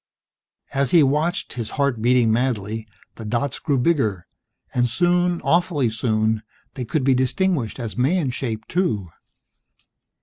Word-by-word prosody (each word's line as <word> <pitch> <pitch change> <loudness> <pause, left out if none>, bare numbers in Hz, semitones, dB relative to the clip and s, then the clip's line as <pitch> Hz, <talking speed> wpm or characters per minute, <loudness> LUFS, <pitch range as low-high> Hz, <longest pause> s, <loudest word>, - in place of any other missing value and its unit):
As 135 -1 +1
he 165 +1 +6
watched, 150 +7 0
his 115 -3 -4
heart 140 -5 +1
beating 120 -1 +3
madly, 110 -2 -1 0.3
the 110 - -7
dots 120 +5 -2
grew 140 -3 0
bigger, 125 - +1 0.5
and 125 -1 +2
soon, 175 +4 +2
awfully 170 -7 +2
soon, 110 -1 0 0.3
they 130 -3 -5
could 135 +5 -1
be 135 0 +4
distinguished 130 - 0
as 115 -3 -5
man 140 +3 +1
shaped, 110 -4 -4
too. 110 - -1
125 Hz, 135 wpm, -22 LUFS, 110-150 Hz, 0.5 s, he